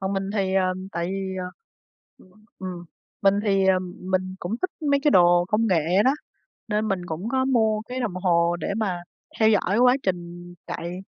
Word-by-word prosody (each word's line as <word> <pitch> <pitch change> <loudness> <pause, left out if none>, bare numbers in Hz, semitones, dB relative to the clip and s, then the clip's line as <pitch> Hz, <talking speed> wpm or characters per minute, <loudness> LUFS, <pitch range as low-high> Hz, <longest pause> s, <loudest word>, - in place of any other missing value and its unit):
còn 190 +1 -2
mình 195 0 -2
thì, 190 -2 0
ờ, 185 -1 +2 0.2
tại 170 0 -2
vì, 190 0 -3
ờ 180 - -5 0.7
ừm, 185 - -20 0.3
ừm, 180 -2 -6 0.4
mình 195 0 +5
thì, 195 -2 +2
ờ, 185 -1 +4 0.2
mình 185 0 -2
cũng 180 +5 -3
thích 370 - 0 0.2
mấy 280 - +3
cái 295 - +5
đồ 175 -1 +5
công 225 +2 +2
nghệ 175 +3 +3
đó, 265 - +5 0.6
nên 215 0 0
mình 180 -2 -2
cũng 175 +7 -4
có 260 +1 +1
mua 220 -5 +2
cái 250 +3 -5
đồng 220 -7 -2
hồ 175 -2 +2
để 200 - -2
mà 185 -6 -2 0.4
theo 220 - +6
dõi 205 0 +2
quá 250 +1 +5
trình 175 -1 -4
chạy, 175 +2 -5
190 Hz, 195 wpm, -24 LUFS, 175-215 Hz, 0.7 s, theo